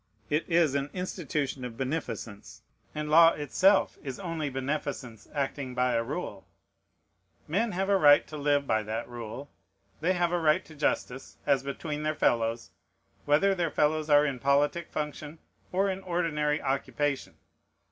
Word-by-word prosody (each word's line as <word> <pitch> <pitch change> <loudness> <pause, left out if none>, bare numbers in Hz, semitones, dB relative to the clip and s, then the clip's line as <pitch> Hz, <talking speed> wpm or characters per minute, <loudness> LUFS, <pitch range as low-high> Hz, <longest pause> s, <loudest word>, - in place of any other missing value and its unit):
It 150 +4 0
is 165 -4 +3
an 140 0 -1
institution 150 -7 -3
of 120 -2 -6
beneficence; 115 -6 -5 0.3
and 150 0 -3
law 165 +1 +8
itself 185 +7 +2
is 135 -4 -6
only 165 -6 -3
beneficence 135 -4 -4
acting 135 -2 -3
by 125 0 +2
a 115 - +2
rule. 115 - -5 1.0
Men 210 +8 0
have 190 +2 -1
a 200 -1 +4
right 145 -5 +6
to 155 - -9
live 145 -1 +1
by 110 -4 +1
that 110 +2 -4
rule; 120 +3 -8 0.5
they 175 +4 +2
have 175 -1 +1
a 175 - +1
right 160 +3 +2
to 160 - -14
justice, 135 -3 -2
as 140 -2 +3
between 150 +2 -4
their 155 0 -1
fellows, 115 -3 0 0.5
whether 155 +7 +4
their 175 -3 0
fellows 155 +1 +1
are 145 0 +6
in 135 -4 -2
politic 145 +5 +1
function 150 +1 -5 0.3
or 195 +2 +2
in 190 0 -2
ordinary 160 -5 0
occupation. 140 +1 -2
150 Hz, 155 wpm, -28 LUFS, 135-165 Hz, 1.0 s, law